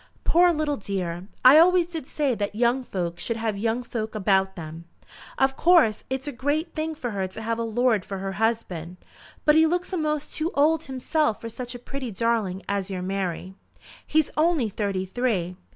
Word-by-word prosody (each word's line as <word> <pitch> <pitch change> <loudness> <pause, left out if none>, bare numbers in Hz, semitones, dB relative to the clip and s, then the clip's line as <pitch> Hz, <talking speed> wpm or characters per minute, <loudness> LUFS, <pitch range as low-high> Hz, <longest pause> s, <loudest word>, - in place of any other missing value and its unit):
"Poor 350 +1 +5
little 300 -3 -1
dear! 185 -3 -4 0.2
I 275 +5 +10
always 360 +1 +5
did 325 -5 -7
say 285 -4 0
that 205 -2 -3
young 240 +3 +2
folk 175 -6 -4
should 230 +6 -2
have 220 -2 -1
young 225 +4 -1
folk 220 -2 -5
about 190 -2 +1
'em. 165 0 -8 0.5
Of 270 0 +2
course 320 -12 +4
it's 265 +2 -3
a - - -2
great 290 +6 -2
thing 315 0 -3
for 250 -6 -4
her 195 -2 -2
to 190 +4 -9
have 230 +1 -1
a - - 0
lord 230 -2 +1
for 195 - -6
her 195 0 -4
husband. 190 -5 -2 0.5
But 300 - +6
he 320 +1 +5
looks 355 +3 -2
a'most 305 -4 -1
too 320 +1 -1
old 315 +2 +3
himself 265 -1 0
for 230 - -6
such 245 +2 -6
a - - -4
pretty 255 +1 -6
darling 215 -3 -1
as 200 -1 -2
your 185 -2 -4
Mary." 190 -1 -3 0.5
"He's 315 -1 +2
only 310 -7 +2
thirty 195 -2 -2
three." 190 -4 -1
230 Hz, 190 wpm, -25 LUFS, 195-300 Hz, 0.5 s, I